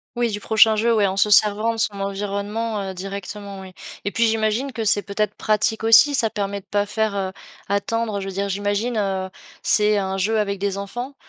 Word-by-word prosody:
Oui, 240 -1 0
du 205 - -3
prochain 220 +1 +4
jeu. 230 +2 +1
Ouais, 210 -2 +3
en 190 0 -2
se 210 - +3
servant 210 +2 +4
de - - -7
son 210 -3 -1
environnement, 205 +2 -3
heu, 190 -1 -5
directement, 200 +1 -7
oui. 190 -1 -11 0.3
Et 205 - -1
puis, 230 - +2
j'imagine 225 +4 0
que 225 -1 -4
c'est 205 -1 +2
peut-être 210 0 -2
pratique 215 +1 0
aussi. 230 +6 +6
Ça 225 -5 +3
permet 200 0 -3
de - - -37
pas 205 +1 -1
faire, 220 0 -1
heu, 190 -1 -2 0.4
attendre. 210 +1 -1
Je 195 - -6
veux - - -4
dire, 200 +1 -2
j'imagine, 205 +4 -1
heu, 190 -2 -1 0.3
c'est 210 0 +4
un 190 0 -3
jeu 220 +4 +1
avec 200 -1 -1
des 200 0 -2
enfants. 240 +7 -6
205 Hz, 215 wpm, -21 LUFS, 200-220 Hz, 0.4 s, aussi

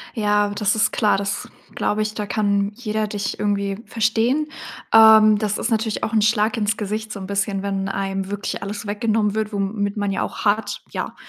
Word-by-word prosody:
Ja, 210 -1 +2
das 205 +1 0
ist 220 0 +2
klar, 210 -2 +2
das 200 0 -3 0.3
glaube 215 +1 0
ich, 215 - -4
da 210 -1 -3
kann 200 -1 +1
jeder 215 -2 -2
dich 205 -1 -4
irgendwie 200 -1 -1
verstehen. 225 +7 +1 0.5
Ähm, 220 -1 +8
das 210 -1 -1
ist 235 - -2
natürlich 220 -1 -1
auch 225 - -2
'n 220 - +3
Schlag 215 +2 +2
ins 210 -1 0
Gesicht 215 +1 -4
so - - -6
'n 190 - -7
bisschen, 200 -1 -1
wenn 195 -1 -2
einem 195 0 -3
wirklich 205 0 -4
alles 205 +1 -5
weggenommen 210 0 0
wird, 220 0 -1
womit 200 +1 -2
man 205 -1 -1
ja - - -1
auch - - -6
hart, 205 0 0
ja, - - -4
210 Hz, 195 wpm, -21 LUFS, 200-220 Hz, 0.5 s, Ähm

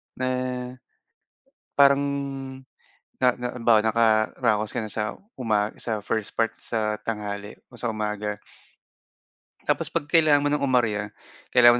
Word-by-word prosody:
na 130 0 -2 1.5
parang, 140 0 +6 1.2
na 125 - +6
na 125 0 -3
'bawa 115 -2 +4
nakaa-raos 110 -1 +2
ka - - 0
na 105 - -6
sa 105 -1 -2 0.2
uma 105 -3 +1
sa 110 -3 -3
first 110 -1 -2
part, 115 0 +2
sa 105 -2 -2
tanghali, 105 -2 -4 0.2
o - - -12
sa 120 - -1
umaga. 105 -1 -2 1.3
Tapos - - +1
'pag 165 -3 -2
kailangan 150 -3 +5
mo - - +3
ng 150 - +1
umarya, 110 -6 +1 0.5
kailangan 120 -1 +8
110 Hz, 125 wpm, -25 LUFS, 105-125 Hz, 1.5 s, kailangan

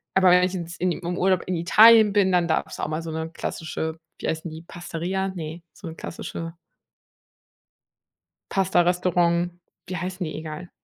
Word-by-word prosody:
Aber 190 -1 +6
wenn 180 0 +6
ich 185 +1 0
ins 170 -1 -5
in 180 +1 +1
im 175 +1 -4
Urlaub 185 -1 +2
in 185 - -1
Italien 215 +5 +7
bin, 195 -2 +3
dann 175 -1 +3
darf's 160 - -1
auch - - -1
mal 155 +1 -3
so 165 0 -6
'ne 160 0 -4
klassische, 160 -1 -4 0.2
wie - - -4
heißen 160 +1 -2
die, 160 +1 -8
Pastaria? 175 +3 -4
Ne, 165 -2 -7
so 185 - -10
'n 160 - -7
klassische 165 -1 -6 2.0
Pastarestaurant, 175 -2 +2 0.4
wie 185 - -4
heißen 185 0 -4
die 155 - -5
egal. 155 +2 -7
175 Hz, 165 wpm, -24 LUFS, 165-185 Hz, 2.0 s, Italien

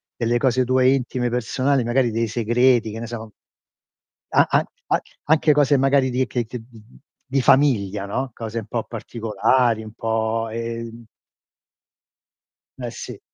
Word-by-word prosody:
delle 120 0 0
cose 130 0 +2
tue 130 +1 +3
intime 125 -2 -1
personali, 130 +3 0
magari 120 +1 +1
dei 115 +1 0
segreti, 120 +1 +2
che 110 - -6
ne 115 - -5
so 110 -2 -8 1.0
a - - +4
a - - +2 0.2
an - - +2 0.3
anche 155 0 +4
cose 145 -1 +3
magari 135 0 +3
di 130 +1 0
che 120 -2 -2
che 120 +2 -7
mhmm, 115 0 -17 0.3
di 135 0 0
famiglia 105 -8 +3
no, 130 +6 -3
cose 115 0 -5
un 110 - -8
po' 115 -2 -2
particolari, 115 +1 0
un 110 - -10
po', 115 0 -1
ehm 115 0 -6 1.8
Eh, 120 - -3
sì. - - -8
120 Hz, 150 wpm, -22 LUFS, 115-130 Hz, 1.8 s, a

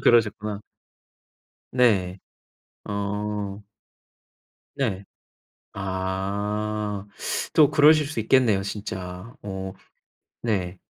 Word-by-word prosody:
그러셨구나. 105 -3 +3 1.1
네. 100 -7 +3 0.7
어. 105 0 -3 1.2
네. 100 -8 -1 0.7
아. 100 +2 -2 0.5
또 150 -3 +7
그러실 150 0 +6
수 150 -7 -3
있겠네요 110 -3 +4
진짜. 95 +1 -5
어. 95 -1 -5 0.7
네. 95 -5 -1
105 Hz, 120 characters per minute, -25 LUFS, 95-110 Hz, 1.2 s, 또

